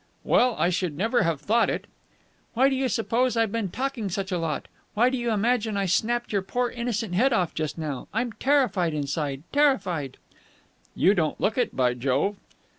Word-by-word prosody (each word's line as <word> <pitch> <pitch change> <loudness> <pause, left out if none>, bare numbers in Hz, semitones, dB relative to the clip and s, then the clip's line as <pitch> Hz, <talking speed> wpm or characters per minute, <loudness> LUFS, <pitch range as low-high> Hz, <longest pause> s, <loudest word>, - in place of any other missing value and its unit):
"Well, 250 -2 +3
I 175 - +2
should 175 -4 -2
never 225 +5 +2
have 165 -5 0
thought 225 +10 +2
it." - - -3 0.7
"Why 265 +4 +4
do 270 - 0
you 260 0 0
suppose 235 +2 0
I've 225 -2 +2
been 225 -3 -2
talking 255 -1 -3
such 190 +1 -3
a 180 - 0
lot? 160 -2 -3 0.3
Why 240 +4 +4
do 260 - -1
you 240 0 -1
imagine 220 0 +1
I 200 - 0
snapped 235 +6 0
your 200 - +2
poor, 245 +5 -1
innocent 230 -5 -3
head 245 +8 +3
off 180 -7 +1
just 155 0 -3
now! 150 -5 -4
I'm 235 +2 -1
terrified 245 - +1
inside, 145 -1 -3
terrified!" 190 - +1 0.8
"You 195 - +4
don't 160 -6 -1
look 215 - +1
it, 250 - -1
by 125 -2 +2
Jove!" 135 +11 0
205 Hz, 190 wpm, -25 LUFS, 165-240 Hz, 0.8 s, Why